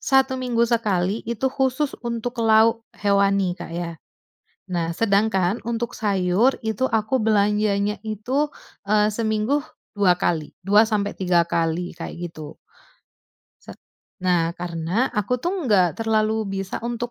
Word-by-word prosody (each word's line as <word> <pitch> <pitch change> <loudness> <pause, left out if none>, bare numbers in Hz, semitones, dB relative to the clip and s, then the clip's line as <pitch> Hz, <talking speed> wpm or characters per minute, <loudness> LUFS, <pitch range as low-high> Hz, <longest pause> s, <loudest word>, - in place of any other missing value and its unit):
1 265 -1 +2
minggu 240 -2 +1
sekali, 210 -4 0
itu 235 +3 -1
khusus 265 +1 0
untuk 235 0 -4
lauk 225 +1 +4 0.2
hewani, 200 -2 +2
Kak, 180 - -8
ya. 170 -1 -3 0.8
Nah, 170 -2 0
sedangkan 200 -2 +1
untuk 235 0 -2
sayur, 200 +4 +1
itu 220 +4 0
aku 225 +3 +1
belanjanya 210 -1 +1
itu, 235 +7 -1 0.4
eee, 210 0 +3
seminggu 220 +6 0 0.3
2 195 -4 +3
kali, 160 -3 -1 0.2
2-3 200 -4 +3
kali, 170 +1 -1
kayak 170 +1 -6
gitu. 155 -1 -9 1.1
Sat - - -12 0.5
nah, 175 -3 +2
karena, 175 +7 -1
aku 210 +4 0
tuh 340 +9 -2 0.2
nggak 185 -5 +3
terlalu 220 -1 +1
bisa 190 - -5
untuk 240 +1 -4
210 Hz, 125 wpm, -23 LUFS, 185-230 Hz, 1.1 s, lauk